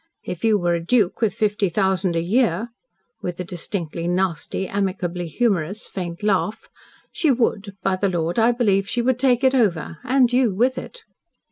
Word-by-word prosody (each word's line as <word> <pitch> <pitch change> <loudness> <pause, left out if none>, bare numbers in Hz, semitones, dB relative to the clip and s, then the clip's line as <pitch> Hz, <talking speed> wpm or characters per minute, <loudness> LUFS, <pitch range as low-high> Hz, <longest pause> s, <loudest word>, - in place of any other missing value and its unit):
"If 180 - -6
you 220 -2 +4
were 175 -2 +1
a 170 -1 -1
duke 210 +1 +1
with 220 -3 +1
fifty 210 -2 +1
thousand 190 -1 +1
a 165 - 0
year," 220 +1 +1 0.5
with 180 0 -5
a - - -1
distinctly 170 -1 -4
nasty, 185 +1 -1
amicably 185 -3 -2
humorous, 195 0 -1
faint 175 -1 -6
laugh, 210 +1 0 0.4
"she 320 - +1
would 220 -6 0
by 190 -1 +1
the 200 +1 +1
Lord, 170 +2 -1
I 230 +2 +5
believe, 200 -5 +1
she 240 - 0
would 255 0 +1
take 255 -1 +2
it 260 0 +4
over 175 - 0
and 250 -1 +3
you 245 -6 +3
with 250 +5 +2
it." 485 -2 -11
195 Hz, 175 wpm, -22 LUFS, 175-235 Hz, 0.5 s, I